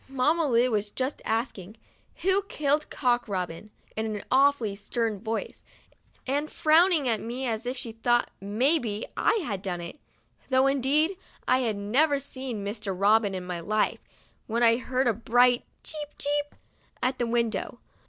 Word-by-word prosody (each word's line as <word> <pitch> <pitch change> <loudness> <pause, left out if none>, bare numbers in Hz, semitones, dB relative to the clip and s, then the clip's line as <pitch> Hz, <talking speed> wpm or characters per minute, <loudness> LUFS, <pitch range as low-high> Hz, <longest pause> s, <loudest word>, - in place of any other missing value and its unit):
Mamma 295 +5 +1
Lu 245 0 +3
was 210 -1 0
just 260 +6 -3
asking: 220 -3 -2 0.5
"Who 380 +2 +3
killed 295 -2 0
Cock 245 -2 +1
Robin?" 185 0 -4 0.3
in 220 0 -2
an 205 - -6
awfully 265 -6 +3
stern 215 +1 -2
voice, 225 +2 -4 0.6
and 290 +3 -1
frowning 320 -1 +4
at 225 -3 +1
me 245 +3 -4
as 230 0 -2
if 255 +2 -2
she 235 -2 -6
thought 240 +2 +1
maybe 220 +1 0
I 435 - +2
had 200 -6 -3
done 180 -3 -3
it, 170 - -8 0.5
though 260 0 +4
indeed 280 +5 +3
60 - - -7
THURSDAY— 380 - -26
SPANKED 255 0 +3
I'd 215 -2 -1
never 275 +9 +2
seen 260 -6 -5
Mr. 205 -2 -3
Robin 205 0 +3
in 180 -1 -5
my 180 -1 -4
life, 210 +5 0 0.5
when 230 +2 0
I 230 0 +6
heard 255 +1 -1
a 235 - +3
bright 245 +3 +3 0.2
"Cheep! 305 -2 -6
Cheep!' 290 0 -2 0.5
at 255 +1 0
the 240 - 0
window. 235 -1 -1
240 Hz, 165 wpm, -27 LUFS, 215-275 Hz, 0.6 s, I